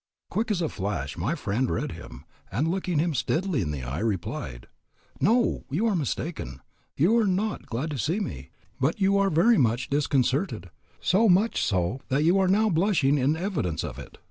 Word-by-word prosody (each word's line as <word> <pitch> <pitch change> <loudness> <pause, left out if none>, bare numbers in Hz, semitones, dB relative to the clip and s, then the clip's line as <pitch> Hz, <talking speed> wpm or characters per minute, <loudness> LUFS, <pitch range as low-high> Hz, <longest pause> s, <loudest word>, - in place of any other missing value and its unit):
Quick 225 +1 -1
as 185 -5 0
a - - +1
flash 95 - -3
my - - -1
friend 120 +6 -1
read 80 - -2
him, - - -10 0.3
and 130 - 0
looking 180 -1 -1
him 165 +2 +1
steadily 155 +5 0
in 80 - -2
the 70 -4 -4
eye, 65 +5 -4
replied, 90 - -3 0.5
"No, 230 - +2
you 165 +12 0
are 220 -3 +2
mistaken, 145 - -3 0.4
you 175 +11 +4
are 220 - +2
not 200 +3 -1
glad 130 +7 -3
to 140 - -4
see 165 - 0
me; 65 - -5 0.3
but 140 +9 0
you 200 0 +3
are 200 0 +3
very 200 +8 +4
much 120 +1 +1
disconcerted, 140 - 0 0.3
so 210 +4 +3
much 195 +6 +3
so 95 +6 0
that 140 +2 +1
you 175 +4 +4
are 190 - +3
now 210 +4 +3
blushing 165 -6 +2
in 140 +4 +2
evidence 160 - -2
of - - -6
it." - - -11
155 Hz, 190 wpm, -26 LUFS, 115-195 Hz, 0.5 s, you